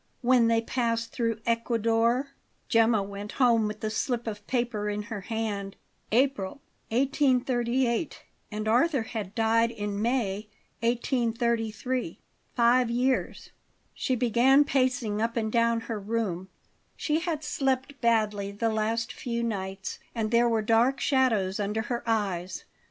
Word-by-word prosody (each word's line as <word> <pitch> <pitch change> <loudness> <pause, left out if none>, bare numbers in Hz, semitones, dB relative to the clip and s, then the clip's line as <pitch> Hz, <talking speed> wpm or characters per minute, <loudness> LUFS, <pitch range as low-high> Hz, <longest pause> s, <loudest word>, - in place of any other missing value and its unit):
When 245 -1 +5
they 230 0 +3
passed 230 -1 -1
through 230 -2 -1
Ecuador 230 +3 +1 0.4
Gemma 225 -3 +3
went 200 +1 -7
home 235 -4 +3
with 210 0 -6
the 215 - -2
slip 240 +2 -1
of 205 -2 -6
paper 235 -4 -1
in 210 0 -2
her 215 -2 -6
hand. 205 -2 -3 0.4
April, 245 -3 +1 0.3
1838 255 0 +1 0.3
and 215 +1 -3
Arthur 255 +3 +3
had 215 -3 -6
died 230 0 +3
in 205 -3 -4
May, 215 -4 -1 0.3
1833. 235 - -1 0.4
Five 245 0 +4
years 250 +2 -1 0.4
She 255 - -1
began 250 +4 +4
pacing 255 -6 0
up 230 +1 -1
and 220 -1 -1
down 230 0 +2
her 225 -2 -4
room. 195 -4 -2 0.5
She 305 +1 0
had 325 -3 -3
slept 270 -1 -1
badly 210 -4 +1
the 225 +3 -1
last 225 +1 -1
few 235 -1 -3
nights, 195 -3 -4 0.2
and 220 -1 -1
there 235 0 +4
were 225 -2 +1
dark 230 +5 +3
shadows 225 -9 +1
under 210 +2 -1
her 240 -1 -3
eyes. 190 -5 -1
230 Hz, 135 wpm, -27 LUFS, 215-245 Hz, 0.5 s, When